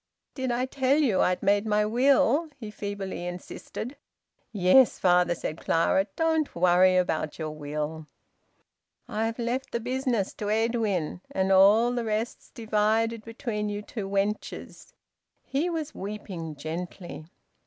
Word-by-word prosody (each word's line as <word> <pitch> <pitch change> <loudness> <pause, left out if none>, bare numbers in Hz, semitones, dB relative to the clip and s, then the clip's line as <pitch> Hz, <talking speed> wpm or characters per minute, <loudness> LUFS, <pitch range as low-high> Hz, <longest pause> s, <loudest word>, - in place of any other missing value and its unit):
"Did 260 -2 -3
I 245 +2 0
tell 265 +1 +1
you 250 -11 +3
I'd 180 +2 +1
made 200 +2 +2
my 210 0 +2
will?" 270 +6 +3
he 220 -5 -8
feebly 200 -3 -5
insisted. 200 +8 -7 0.5
"Yes, 215 +5 +5
father," 180 -1 +3
said 155 -1 -5
Clara. 180 +4 +2
"Don't 320 -2 +1
worry 180 +1 +5
about 160 -4 0
your 155 -1 -4
will." 150 +1 -5 1.0
"I've 225 0 -2
left 245 +2 -2
th' 235 - -3
business 250 -5 -1
to 205 - -1
Edwin, 215 -7 0
and 190 0 0
all 210 +6 +6
th' 240 - -1
rest's 220 +1 -3
divided 220 0 0
between 225 -2 -4
you 205 0 -4
two 205 -3 -6
wenches." 200 +2 -3 0.5
He 295 +6 -1
was 315 -3 -3
weeping 190 -6 -6
gently. 165 +2 -6
210 Hz, 130 wpm, -27 LUFS, 180-240 Hz, 1.0 s, all